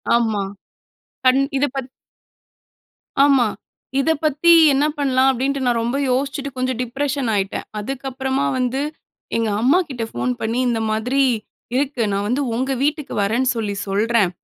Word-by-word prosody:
ஆமா. 220 -4 +1 0.8
கண் 255 +1 +5 0.2
இது 285 +2 +2
பத் 265 -1 -4 1.3
ஆமா. 270 -5 +4 0.5
இத 295 - +1
பத்தி 310 +3 +3 0.2
என்ன 285 +2 +2
பண்ணலாம், 265 -2 +3
அப்படின்ட்டு 270 +2 -1
நான் 240 -1 +2
ரொம்ப 240 +4 -1
யோசிச்சுட்டு 275 +2 -1
கொஞ்சம் 255 -1 -1
டிப்ரஷன் 270 +1 -2
ஆயிட்டேன். 195 0 -2
அதுக்கப்புறமா 265 +3 -2
வந்து, 255 +1 0 0.6
எங்க 225 -1 0
அம்மாகிட்ட 270 -2 +2
ஃபோன் 250 - -1
பண்ணி, 225 +3 -1
"இந்த 230 -2 0
மாதிரி 245 +6 +1 0.5
இருக்கு. 270 -2 0
நான் 200 +1 -1
வந்து 250 +6 0
உங்க 260 +3 -1
வீட்டுக்கு 300 0 -1
வரேன்னு 240 +5 +1
சொல்லி 210 -3 -2
சொல்றேன். 210 0 +2
255 Hz, 135 wpm, -20 LUFS, 230-275 Hz, 1.3 s, கண்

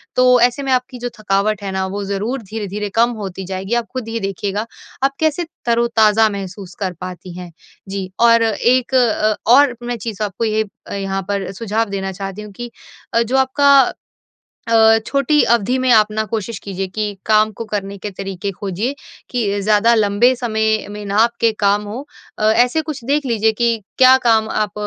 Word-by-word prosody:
तो 255 0 +4
ऐसे 245 +3 +2
में 270 - -2
आपकी 250 0 -1
जो 245 0 -3
थकावट 205 0 0
है 195 - -3
ना 190 0 -1
वो 200 +2 -4
ज़रूर 205 +7 -3
धीरे-धीरे 210 0 -5
कम 235 +1 +4 0.2
होती 190 +1 -8
जाएगी 190 +4 -4
आप 235 -1 0
ख़ुद 255 -3 -4
ये 230 0 -3
देखिएगा। 195 +2 -3 0.4
आप 275 - +3
कैसे 315 +2 0 0.2
तरोताज़ा 225 -2 +3
महसूस 195 -2 -7
कर 190 -3 -2
पाती 180 -1 -8
हैं। 180 -1 -8 0.4
जी, 190 -1 -5
और 230 -1 +5
एक 240 +3 +1
अ, 215 -3 +2 0.2
और 270 -1 +6
मैं 240 0 -3
चीज़ 215 -1 -5
आपको 205 +3 -2
ये 220 0 0 0.3
यहाँ 195 -1 -2
पर 200 -2 -2
सुझाव 220 +2 -2
देना 195 -1 -3
चाहती 195 +2 -6
हूँ 210 -1 -10
कि 240 +3 -8 0.4
अ, 230 - +3
जो 250 +4 0
आपका 275 +2 +3 1.0
अ, 225 -1 +5
छोटी 280 +2 +2
अवधि 235 +2 +2
में 255 -1 +2
आप 215 -2 +5
ना 215 0 -1
कोशिश 220 -1 -3
कीजिए 195 -1 -4
कि 205 0 -4
काम 215 0 +3
को 230 +2 -7
करने 200 -2 -4
के 205 +2 -6
तरीके 195 0 -5
खोजिए, 200 +8 -3 0.3
कि 205 -5 -1
ज़्यादा 215 +3 +3
लंबे 215 +4 +3
समय 220 -2 0
में 205 0 -7
ना 200 - -3
आपके 230 0 +2
काम 205 0 +2
हो। 230 +7 -7 0.3
अ, - - -2
ऐसे 245 +7 +3
कुछ 295 -5 -7
देख 290 +1 0
लीजिए 225 -3 +2
कि 230 +1 +1 0.2
क्या 260 0 +7
काम 225 -3 +2
आप 210 -3 -1
215 Hz, 185 wpm, -18 LUFS, 200-240 Hz, 1.0 s, क्या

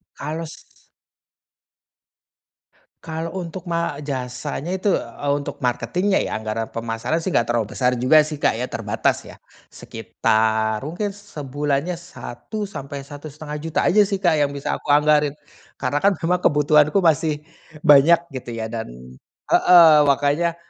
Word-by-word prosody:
Kalau 160 +3 -5
s 155 - -12 2.4
Kalau 165 +2 -5
untuk 180 0 -6
ma 170 -4 -2
jasanya 135 +3 -5
itu 205 - -2
untuk, - - -3 0.2
eee 145 0 0
untuk 140 - -6
marketing-nya 140 - 0
ya, 110 - -3
nggak 110 0 -4
ada 115 0 -2
permasalahan 115 +7 -2
sih, 180 +2 -3
nggak 120 - +4
terlalu 115 -3 0
besar 125 -1 +1
juga 150 +5 +5
sih 150 -1 -6
Kak - - +2
ya, 120 - -3
terbatas 115 -2 -1
ya. - - -11 0.3
Sekitar, 110 0 -1
mungkin 200 +5 -3
sebulannya 150 -3 -3
Rp1.000.000-Rp1.500.000 150 - -6
aja 205 +1 +4
sih 195 -1 -3
Kak 160 -4 +3
yang 140 -1 0
bisa 140 - -3
aku - - -16
anggarin, 150 -1 +3 0.4
karena 140 +2 -1
kan 200 +1 +3
memang 175 +3 0
kebutuhanku 150 +4 +3
masih 155 -2 +1 0.4
banyak 165 +3 +6 0.2
gitu 120 -1 -8
ya, 110 0 -5
dan 115 -1 -4 0.6
heeh, 170 -3 +7
makanya, 145 +5 +1
150 Hz, 135 wpm, -21 LUFS, 130-170 Hz, 2.4 s, heeh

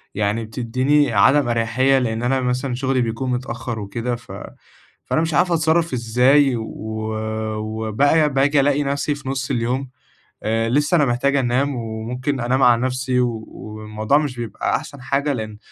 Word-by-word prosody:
يعني 105 +2 0
بتدّيني 130 +5 +1
عدم 130 +6 +4
أريحيّة 120 +4 +2
لإن 115 -2 -2
أنا 130 +2 +1
مثلًا 125 +1 -1
شغلي 130 0 0
بيكون 120 +2 -2
متأخر 125 -2 -4
وكده، 115 +4 -3
ف 120 - -13 0.7
فأنا 155 - +1
مش 165 0 -1
عارفة 175 +3 +3
أتصرّف 165 0 +1
إزاي؟ 125 +3 +3
و 110 -1 -5 0.9
وبقى 110 +8 +1
باجي 140 +2 +3
ألاقي 145 +1 +2
نفسي 140 +1 -1
في 135 -2 -7
نُص 135 -1 -2
اليوم، 125 +2 -1 0.5
آآ 115 +1 0
لسّه 145 +7 +1
أنا 150 - +4
محتاج 135 +2 +1
أنام 135 +2 +1
وممكن 120 +4 -3
أنام 125 +3 +1
على 120 -1 +5
نفسي 130 0 0
و 115 -3 -1
والموضوع 110 +4 -2
مش 145 -4 -3
بيبقى 115 -3 -1
أحسن 140 -3 -9
حاجة، 140 +3 0
لإن 110 -4 -5
125 Hz, 155 wpm, -21 LUFS, 115-140 Hz, 0.9 s, على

